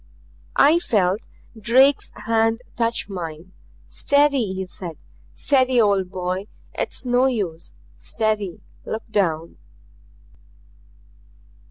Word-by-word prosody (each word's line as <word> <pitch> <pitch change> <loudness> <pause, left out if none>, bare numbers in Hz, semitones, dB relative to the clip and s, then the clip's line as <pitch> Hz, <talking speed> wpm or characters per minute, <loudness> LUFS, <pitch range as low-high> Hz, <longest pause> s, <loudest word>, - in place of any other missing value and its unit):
I 310 +5 +5
felt 200 - 0 0.3
Drake's 260 +6 +3
hand 225 0 +2
touch 230 -2 +1
mine. 170 -2 -7 0.3
"Steady," 280 -7 +2
he 190 0 -3
said. 175 -3 -8 0.4
"Steady, 260 -3 +3
old 200 -4 +3
boy. 185 +1 -3 0.3
It's - - -4
no 250 +1 +3
use. 185 - -3 0.2
Steady. 205 - -2 0.2
Look 220 +1 -4
down." 170 -6 0
215 Hz, 90 wpm, -22 LUFS, 185-245 Hz, 0.4 s, I